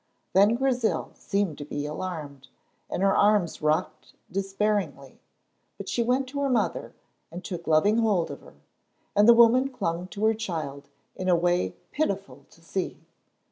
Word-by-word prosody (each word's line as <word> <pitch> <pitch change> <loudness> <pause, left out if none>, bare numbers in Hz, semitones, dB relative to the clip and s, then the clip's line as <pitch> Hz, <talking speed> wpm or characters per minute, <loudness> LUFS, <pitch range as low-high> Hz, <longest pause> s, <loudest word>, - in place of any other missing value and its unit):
Then 205 +4 +5
Grizel 250 -3 0
seemed 200 -7 -2
to - - -5
be 145 0 -4
alarmed, 150 -4 -6 0.4
and 190 - -2
her 195 0 +4
arms 205 -5 +2
rocked 155 +4 -1 0.2
despairingly, 195 -7 -2 0.6
but - - -8
she 240 - 0
went 255 +3 +1
to 280 +2 -4
her 280 - +1
mother 250 - -1 0.3
and 175 +2 -9
took 175 -3 -6
loving 180 +8 +4
hold 205 -7 +1
of - - -9
her, - - -16 0.6
and 205 +2 +6
the 235 - +9
woman 240 +3 +5
clung 175 -8 -3
to 205 +3 -3
her 220 - +4
child 155 -10 -5 0.3
in 185 0 -2
a 180 - +5
way 170 - +1 0.2
pitiful 195 - -3
to 165 - -21
see. 185 +3 -4
195 Hz, 160 wpm, -26 LUFS, 160-220 Hz, 0.6 s, the